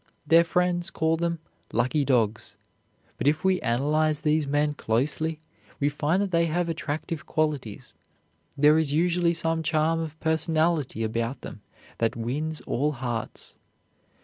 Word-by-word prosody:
Their 165 +3 +6
friends 175 +1 0
call 160 -2 +1
them 170 0 -1 0.3
"lucky 125 +5 +1
dogs." 115 -5 0 0.6
But - - 0
if 150 +1 +2
we 190 -1 +2
analyze 150 +5 +1
these 150 -1 +2
men 145 +1 +1
closely, 145 +6 -1 0.4
we 145 - +2
find 150 +5 0
that 195 - -3
they 170 -1 +3
have 170 +2 -1
attractive 160 0 -4
qualities. 150 -9 -2 0.6
There 150 +2 +5
is 155 -3 0
usually 170 +2 +2
some 165 0 0
charm 160 0 +1
of 160 -1 -5
personality 160 -5 +1
about 115 +3 -2
them - - -9 0.4
that 115 -1 +1
wins 145 +7 -3
all 150 +4 -1
hearts. 120 -3 -4
155 Hz, 140 wpm, -26 LUFS, 140-165 Hz, 0.6 s, Their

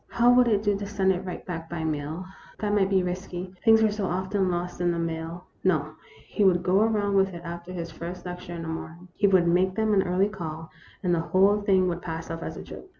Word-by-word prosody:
How 240 +1 +4
would 250 0 +5
it 210 -2 +2
do 205 -1 +2
to 200 - -4
send 195 -2 +2
it 185 0 -2
right 180 - -6
back 165 -3 -5
by 170 -2 -4
mail? 155 +3 -3 0.3
That 210 -1 -1
might 195 -2 +3
be 190 -2 +3
risky; 180 0 -5
things 225 -1 +6
were 215 - +4
so 205 -2 -2
often 190 +1 0
lost 175 0 -3
in 175 - +2
the 170 - 0
mail. 165 +1 -4 0.2
No; 155 -6 +2 0.4
he 210 - 0
would 180 -2 +4
go 185 +2 +3
around 210 -2 +1
with 195 -2 +2
it 170 - -7
after 170 +1 -7
his 170 -2 -5
first 175 +2 -7
lecture 180 0 -6
in 165 - -5
the - - -6
morning. 165 +2 -7
He 200 - +3
would 185 -3 +4
make 185 +2 +2
them 220 0 +1
an 195 - +5
early 190 +2 +1
call, 160 -4 -7 0.3
and 180 -2 +2
the 170 - +2
whole 195 +5 +3
thing 190 -2 +3
would 175 -1 -2
pass 165 -1 -5
off 165 0 -5
as - - -5
a - - -6
good - - -11
joke. 380 - -10
180 Hz, 255 wpm, -26 LUFS, 170-200 Hz, 0.4 s, things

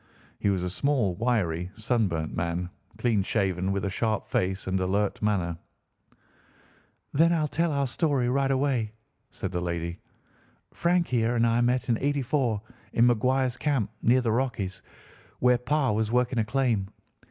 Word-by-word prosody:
He 100 - +1
was 95 -2 0
a 90 - -1
small, 130 -5 +1
wiry, 90 -6 0
sunburnt 105 -9 -1
man, 85 +1 -2 0.3
clean 115 -5 +2
shaven, 95 -2 0
with 100 0 -1
a - - 0
sharp 110 +1 -1
face 95 +1 -1
and 95 0 0
alert 100 +2 0
manner. 90 -6 0 1.5
"Then 165 +4 +4
I'll 155 -3 +1
tell 165 +3 0
our 140 -1 +1
story 135 -1 0
right 135 +2 +1
away," 130 -5 0 0.4
said 95 - -5
the 90 -2 -2
lady. 85 -1 -3 0.7
"Frank 170 0 +1
here 120 -1 +1
and 115 0 +3
I 115 +1 +2
met 125 +1 +1
in 115 -3 +1
'84, 135 -6 0 0.3
in 115 - +4
McQuire's 125 +2 +2
camp, 135 -9 0
near 125 +3 +4
the 115 -3 0
Rockies, 110 -6 -2 0.6
where 125 -1 +3
Pa 135 0 +1
was 110 +1 0
working 125 0 +1
a - - +3
claim. 120 -6 +1
115 Hz, 155 wpm, -27 LUFS, 95-130 Hz, 1.5 s, Then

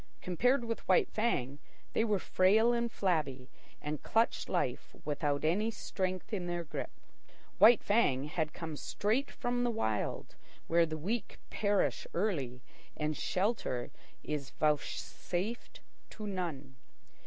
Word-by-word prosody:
Compared 245 - +2
with 230 -1 -2
White 185 - +4
Fang, 145 - 0 0.3
they - - +3
were 215 -3 +2
frail 215 +6 +4
and 235 -1 0
flabby, 150 -11 -1 0.3
and 150 0 -4
clutched 225 +1 +1
life - - -1
without 145 0 0
any 205 +8 +2
strength 185 -2 -3
in 180 -4 -1
their 175 0 -2
grip. 155 - -4 0.7
White 230 0 +8
Fang 200 - +3
had 155 +1 -2
come 160 -2 -6
straight 220 - 0
from 245 0 -1
the 245 - +2
Wild, 110 - -1 0.3
where 170 0 +4
the 155 0 -4
weak 210 +9 -3
perish 205 -1 +1
early 140 - -1 0.3
and 150 0 -1
shelter 185 - -1 0.3
is 145 -3 -3
vouchsafed 175 - -2 0.3
to 215 - -7
none. 160 -9 -4
180 Hz, 130 wpm, -33 LUFS, 150-220 Hz, 0.7 s, White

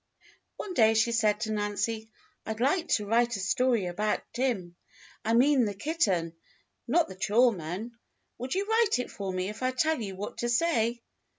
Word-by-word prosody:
One 385 - -5
day 225 -6 +4
she 230 +2 +3
said 215 -2 +2
to 220 - -2
Nancy: 215 +1 -2 0.3
"I'd 220 0 -5
like 310 +8 +1
to 210 - +1
write 235 +2 +2
a - - -4
story 235 +2 +1
about 210 +4 -1
Tim. 225 -9 -1 0.5
I 225 +1 +1
mean 260 0 +4
the 205 -1 -3
kitten, 195 - 0 0.5
not 325 +7 +3
the 190 - -8
chore 225 +6 +3
man. 185 +5 -5 0.5
Would 255 +7 -3
you 390 +1 0
write 445 0 +2
it 250 - -4
for 195 -2 -4
me 185 0 -2
if 215 +3 -8
I 255 - +2
tell 290 +2 0
you 195 -3 -5
what 205 +2 -6
to 240 - -1
say.?" 235 -4 +1
225 Hz, 185 wpm, -28 LUFS, 205-255 Hz, 0.5 s, day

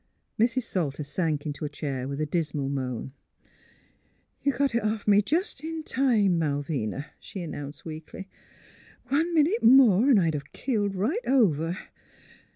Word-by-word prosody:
Mrs. 240 +3 +2
Salter 155 - -2
sank 150 0 -2
into 150 +1 -5
a 150 - -2
chair 140 -3 -4
with 140 +1 -4
a 155 - 0
dismal 150 -3 -2
moan. 130 -2 -3 0.5
* - - -32
' - - -42
You 280 - +3
got 275 0 0
it 235 - +1
off 215 0 -2
me 205 0 +6
jest 315 - -2
in 320 0 -4
time, 220 - +2
Malvina, 145 -4 -2
' - - -35
' - - -42
she 190 - -7
announced, 145 -3 -7
weakly. 160 +4 -8 0.4
*' - - -26
One 325 +4 +2
minute 330 +9 +3
more 245 -2 +6
'n' 255 - +6
I'd 165 -4 +2
a 150 - -2
keeled 205 -6 -1
right 255 - 0
over! 175 - +2
185 Hz, 170 wpm, -27 LUFS, -, 0.5 s, me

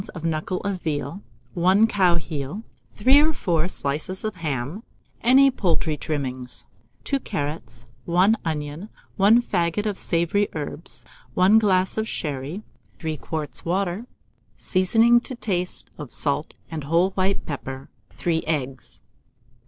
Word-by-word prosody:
of 160 - -7
knuckle 165 +3 -1
of 195 -3 -3
veal, 155 +3 -3 0.3
1 185 +5 +4
cow 190 -5 +3
heel, 155 +4 -4 0.3
3 260 +7 +6
or 315 +1 +4
4 170 - 0
slices 155 +3 -3
of 215 -3 -3
ham, 150 - -3 0.4
any 270 +3 +6
poultry 170 -8 0
trimmings, 130 -4 -4 0.4
2 275 - 0
carrots, 145 - -5 0.2
1 185 +6 +4
onion, 155 +4 -4 0.3
1 210 +4 +6
faggot 175 0 0
of 205 -2 -1
savoury 170 +4 +1
herbs, 155 +2 -6 0.3
1 195 +4 +6
glass 190 -1 +2
of 220 - -1
sherry, 150 +6 -4 0.3
3 160 -2 -3
quarts 155 -2 -4
of - - -9
water; 190 +5 -1 0.5
seasoning 225 +6 +4
to 255 - -4
taste 180 -6 -2
of 145 -4 -7
salt 145 +1 -1 0.2
and 155 -3 -4
whole 170 +5 +3
white 190 +1 0
pepper; 135 -2 -6 0.3
3 165 -2 0
eggs. 135 -4 -3
175 Hz, 135 wpm, -24 LUFS, 150-200 Hz, 0.5 s, 3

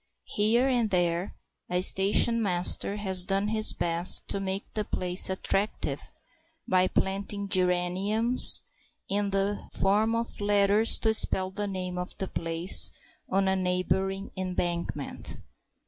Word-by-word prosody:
Here 225 +5 +1
and 240 -4 -1
there 175 -1 -2 0.3
a 180 0 -1
station 205 +5 +4
master 185 0 +3
has 190 -3 +2
done 195 +2 -2
his 215 0 +4
best 170 +1 +2
to - - -1
make 195 +1 -5
the 215 - -3
place 180 -2 0
attractive 195 +2 -4 0.6
by 185 0 +1
planting 200 +2 -4
geraniums 190 +6 +2 0.4
in 200 0 -3
the 195 +1 -3
form 215 +4 -1
of 230 -2 -6
letters 205 +2 +3
to 220 -1 +1
spell 190 -3 +4
the 205 +2 -5
name 185 -2 -6
of 180 - -8
the 190 - -5
place 165 +2 +1 0.4
on 195 +1 -1
a 190 - 0
neighbouring 190 +1 -3
embankment. 180 -2 -6
195 Hz, 130 wpm, -26 LUFS, 185-205 Hz, 0.6 s, station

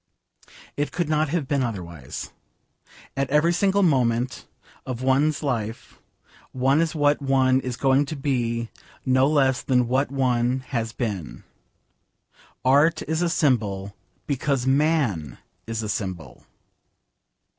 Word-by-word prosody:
It 145 0 -2
could 175 -3 -1
not 155 -1 +1
have 155 -3 -1
been 140 -1 +1
otherwise. 85 - -5 0.8
At 135 -1 -1
every 150 +4 +3
single 200 +2 +2
moment 125 -5 +1 0.4
of 130 -1 -5
one's 140 +4 +2
life 115 -5 -4 0.5
one 135 +4 +2
is 165 0 -1
what 145 -1 +2
one 130 -1 +3
is 125 -2 -5
going 135 +1 +2
to 155 - -4
be 120 -5 -1 0.3
no 130 0 +4
less 135 -4 +2
than 125 -2 +2
what 130 +3 +1
one 130 -1 +1
has 115 -3 -2
been. 105 - -5 1.2
Art 145 +5 +4
is 160 +2 -2
a 175 - +1
symbol, 105 -10 0 0.3
because 140 -2 -1
man 135 - +1 0.3
is 115 -1 -3
a 105 - -4
symbol. 85 - -5
130 Hz, 125 wpm, -24 LUFS, 115-145 Hz, 1.2 s, no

